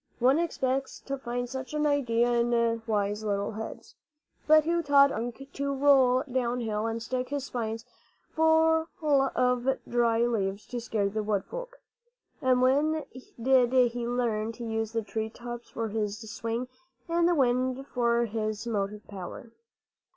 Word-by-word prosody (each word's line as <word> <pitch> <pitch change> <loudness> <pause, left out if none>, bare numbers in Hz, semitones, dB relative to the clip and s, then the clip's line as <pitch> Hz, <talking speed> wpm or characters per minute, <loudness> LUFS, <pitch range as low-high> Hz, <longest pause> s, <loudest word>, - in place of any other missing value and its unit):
One 260 +5 +4
expects 270 -5 -1
to 275 - -4
find 245 -2 -4
such 265 +3 -6
an 300 0 +1
idea 245 -5 +2
in 235 -1 +1
wise 210 -1 0
little 200 -1 -1
heads. 220 +1 -8 0.5
But 310 0 +7
who 340 +2 +1
taught 280 -2 +5
Unk 230 +1 -4
Wunk 275 +1 -12
to 280 0 -2
roll 265 -2 +4
downhill 240 -5 -1
and 230 0 -3
stick 255 +1 -3
his 285 -1 -2
spines 225 -3 -4 0.5
full 320 0 +3 0.2
of 270 -3 +2
dry 235 -1 +2
leaves 200 -4 -1
to 245 -1 -4
scare 215 -3 0
the 215 +2 -2
wood 205 -2 -1
folk? - - -8 0.6
And 255 -1 +3
when 300 +4 +2 0.4
did 250 0 +4
he 240 0 -4
learn 230 -3 -1
to 235 - -8
use 225 -1 -2
the 225 -1 -1
tree 220 +1 -3
tops 240 +1 -8
for 225 -1 -3
his 210 -1 -2
swing 230 +2 -3 0.4
and 340 0 +2
the 350 - +3
wind 255 -1 +1
for 235 -3 +1
his 215 0 -3
motive 210 -2 -3
power? 200 +4 -8
240 Hz, 155 wpm, -28 LUFS, 225-270 Hz, 0.6 s, But